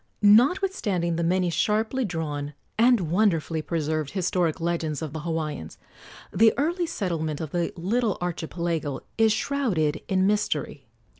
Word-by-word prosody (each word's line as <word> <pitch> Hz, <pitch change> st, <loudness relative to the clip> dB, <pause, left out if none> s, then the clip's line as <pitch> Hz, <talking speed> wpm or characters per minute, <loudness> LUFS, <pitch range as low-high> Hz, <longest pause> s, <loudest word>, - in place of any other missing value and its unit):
Notwithstanding 210 Hz, -, +3 dB
the 170 Hz, -, -1 dB
many 180 Hz, +1 st, +1 dB
sharply 220 Hz, -, 0 dB
drawn 150 Hz, -5 st, -4 dB, 0.2 s
and 225 Hz, -8 st, +3 dB
wonderfully 170 Hz, -5 st, +1 dB
preserved 155 Hz, -2 st, -2 dB
historic 180 Hz, -4 st, 0 dB
legends 165 Hz, -2 st, -2 dB
of 150 Hz, -3 st, -5 dB
the 160 Hz, -, -4 dB
Hawaiians, 155 Hz, -, -4 dB, 0.6 s
the 220 Hz, +4 st, +5 dB
early 340 Hz, +4 st, 0 dB
settlement 165 Hz, -, -2 dB
of 155 Hz, -3 st, -5 dB
the 175 Hz, -1 st, -1 dB
little 215 Hz, +4 st, 0 dB
archipelago 170 Hz, -4 st, -3 dB, 0.2 s
is 220 Hz, -1 st, +5 dB
shrouded 210 Hz, -, 0 dB
in 190 Hz, 0 st, +2 dB
mystery. 210 Hz, +1 st, -1 dB
175 Hz, 130 wpm, -25 LUFS, 160-215 Hz, 0.6 s, the